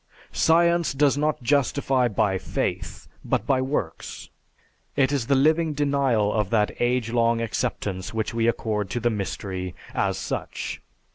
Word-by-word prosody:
"Science 170 0 +3
does 140 0 +3
not 150 -2 -1
justify 135 -1 +2
by 100 -3 +1
faith, - - -3 0.2
but - - 0
by 130 -2 +2
works. 130 - -4 0.6
It 135 0 +3
is 135 -5 -1
the 140 - +3
living 155 +3 +3
denial 140 -7 +1
of 105 -3 0
that 105 -2 +2
age 120 -1 +1
long 115 -1 +2
acceptance 105 -5 -3
which 110 0 -2
we 115 0 +1
accord 105 -4 -1
to 120 - -2
the 120 +1 +1
mystery 95 -3 -4 0.2
as - - 0
such. - - -4
120 Hz, 145 wpm, -25 LUFS, 105-140 Hz, 0.6 s, Science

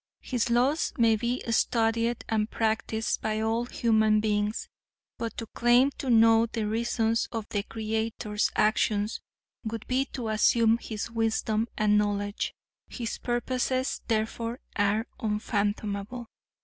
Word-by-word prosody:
His 245 -2 -1
laws 255 +7 +2
may 230 -2 +4
be 240 +3 -2
studied 230 +1 +1
and 215 -1 0
practiced 220 0 -1
by 215 0 -1
all 225 +2 0
human 220 -3 +2
beings, 210 0 -1 0.5
but 230 -1 -4
to 225 - -4
claim 240 +4 +3
to 270 - -3
know 225 0 +6
the 225 -1 -3
reasons 225 +1 0
of 225 -2 -4
the 205 - -1
Creator's 220 -1 -2
actions 215 0 +1 0.4
would 225 -1 -5
be 260 +2 +1
to 245 -5 -5
assume 225 +1 +3
His 220 0 -5
wisdom 225 -1 0
and 210 -1 +4
knowledge. 205 0 -2 0.3
His 235 -2 -5
purposes, 255 +2 -1
therefore, 230 +2 -1 0.2
are 205 +2 +1
unfathomable. 210 0 -2
225 Hz, 125 wpm, -28 LUFS, 215-235 Hz, 0.5 s, know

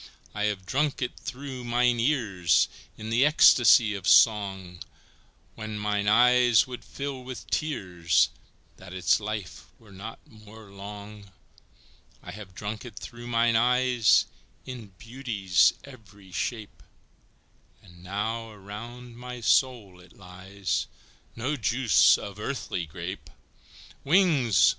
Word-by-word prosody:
I 105 0 -1
have 100 -3 -2
drunk 145 +7 -1
it 125 - -4
through 130 -1 -7
mine 120 0 +1
ears 100 - +2 0.3
In 110 +1 -7
the 120 +3 +3
ecstasy 120 -7 +6
of 100 -2 -6
song, 95 -5 +3 0.7
When 110 -1 -6
mine 105 -1 -1
eyes 120 +1 +5
would 125 -1 -9
fill 140 -2 -6
with 130 0 -8
tears 90 - +1 0.5
That 95 0 -11
its 90 - +2
life 105 -3 -6
were 110 -3 -19
not 100 +4 -9
more 110 -1 -15
long; 100 +1 -10 0.9
I - - -8
have 95 -2 -11
drunk 105 +1 -5
it 120 -4 -11
through 120 0 -9
mine 115 -1 +2
eyes 125 0 +3 0.4
In 125 -4 -8
beauty's 105 -10 +1
every 100 -8 -15
shape, 110 +3 -5 1.0
And 85 -3 -17
now 110 +4 -3
around 115 +4 -10
my 125 0 -8
soul 115 -6 +1
it 90 - -19
lies, 95 0 -4 0.5
No 130 +6 -2
juice 120 0 +4
of 100 0 -9
earthly 105 -8 -4
grape! 85 +4 -7 0.7
Wings! 145 - +3
110 Hz, 120 wpm, -26 LUFS, 100-125 Hz, 1.0 s, ecstasy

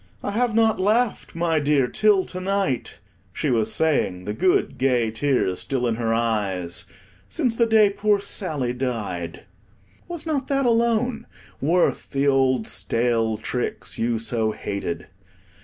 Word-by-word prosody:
"I 205 - -2
have 230 +1 0
not 225 -3 +3
laughed, 215 +2 0
my 165 -2 +1
dear, 145 -2 +2
till 200 +8 +3
to 185 - -6
night," 190 -9 -1 0.3
she 145 +8 -1
was 110 -2 +1
saying, 110 -14 0
the 105 - -3
good, 180 +10 +1
gay 125 -4 +2
tears 115 -6 0
still 130 -2 -1
in 120 - +1
her 115 -1 -1
eyes, 105 -7 -1 0.4
"since 235 - 0
the 235 0 +3
day 215 -2 +5
poor 205 0 +2
Sally 150 - -1
died." 110 -10 -4 0.6
Was 345 -2 -5
not 290 -5 -1
that 275 -1 +1
alone 235 0 +1 0.3
worth 170 +5 +1
the 140 +1 0
old 130 -4 +2
stale 115 +3 0
tricks 125 +3 -3
you 115 0 +1
so 115 0 0
hated? 100 -5 -4
135 Hz, 145 wpm, -23 LUFS, -, 0.6 s, day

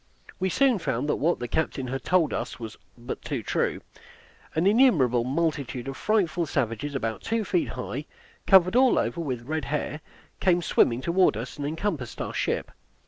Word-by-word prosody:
We 190 0 +1
soon 260 +1 +3
found 130 -3 -2
that - - +1
what 170 +4 +1
the 120 - -4
captain 135 -2 -2
had 135 0 -4
told 180 -4 +2
us - - -4
was 110 -2 -7 0.2
but 120 +1 -6
too - - -4
true. - - -1 0.7
An 160 +3 +1
innumerable 180 - +4
multitude 140 -2 -2
of 135 - -4
frightful 175 -5 +1
savages, 140 +2 -2
about 115 -4 -2
two 225 0 -1
feet 340 - +1
high, - - -5 0.4
covered 190 +1 +6
all 255 0 +5
over 170 - 0
with 125 -6 -4
red 155 +1 -2
hair, 150 +1 -3 0.4
came 175 -2 +2
swimming 120 -5 +3
toward 170 - +3
us 125 +5 -6
and 145 -1 -3
encompassed 160 - -3
our - - -4
ship. - - -1
155 Hz, 175 wpm, -26 LUFS, 125-185 Hz, 0.7 s, covered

